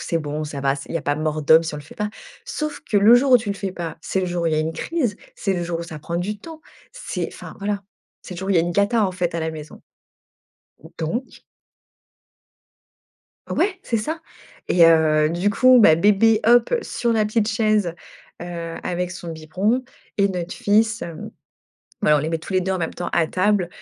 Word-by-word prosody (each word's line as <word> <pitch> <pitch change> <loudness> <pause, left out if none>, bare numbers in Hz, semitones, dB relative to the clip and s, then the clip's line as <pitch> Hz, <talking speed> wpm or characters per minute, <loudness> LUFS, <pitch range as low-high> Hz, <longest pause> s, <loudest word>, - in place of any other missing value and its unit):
c'est 165 - -1
bon, 150 0 -4
ça 145 -2 -6
va, 135 0 +1
c'est 135 - -9
il - - -6
y 165 - +1
a - - -9
pas 145 - 0
mort 155 0 -2
d'homme 160 +3 +6
si 160 -2 -4
on - - -4
le 150 - -8
fait 145 - -14
pas.». 210 0 -3 0.3
Sauf 305 -1 -4
que 210 - -2
le 205 +4 +7
jour 260 +2 +4
où 250 - +9
tu 220 -3 -4
le - - -2
fais 195 -2 -4
pas, 170 -4 -5
c'est 190 - -2
le 185 - -1
jour 175 -1 -2
où - - +1
il 160 - +1
y 155 - +2
a - - +1
une 155 +1 -1
crise, 250 - -2 0.2
c'est 195 - -1
le 175 - -2
jour 170 -1 -3
où - - -4
ça 160 -2 -8
prend 170 +3 -4
du 200 +4 -3
temps, 320 +7 -11 0.3
c'est - - -4
enfin - - -10
voilà, 200 0 -2 0.4
c'est 185 - -8
le - - -8
jour 190 +2 -5
où - - +1
il - - +3
y - - +6
a 165 - +3
une 175 - -2
cata, 205 +3 +2
en 185 - -3
fait, 175 -2 -2
à 170 - -1
la 160 0 -2
maison. 155 -1 -10 1.2
Donc. 230 +12 -4 2.1
Ouais, 380 -2 0
c'est 230 - -1
ça! 310 +10 -3 0.5
Et, 175 -1 +5
heu, 155 -2 +4
du 175 +5 0
coup, 255 +3 +6
bah, 160 -7 +7
bébé, 210 +4 +4
hop, 240 0 +5
sur 235 -1 -1
la 215 -1 +2
petite 215 0 0
chaise, 215 -7 +1 0.5
heu, 170 -1 -6
avec 180 0 -2
son 175 -2 -7
biberon 185 +10 -1 0.3
et 200 -1 +3
notre 180 -2 -4
fils, 220 +2 +2
hem 165 -2 -7 0.7
bah, 150 - +5
on - - +2
les 155 - -2
met 165 0 -1
tous 165 - -9
les 185 - +3
deux 190 +1 -1
en 190 - -1
même 165 -2 -2
temps 175 - -4
à 165 - +2
table. 185 -1 +1
180 Hz, 235 wpm, -22 LUFS, 165-215 Hz, 2.1 s, où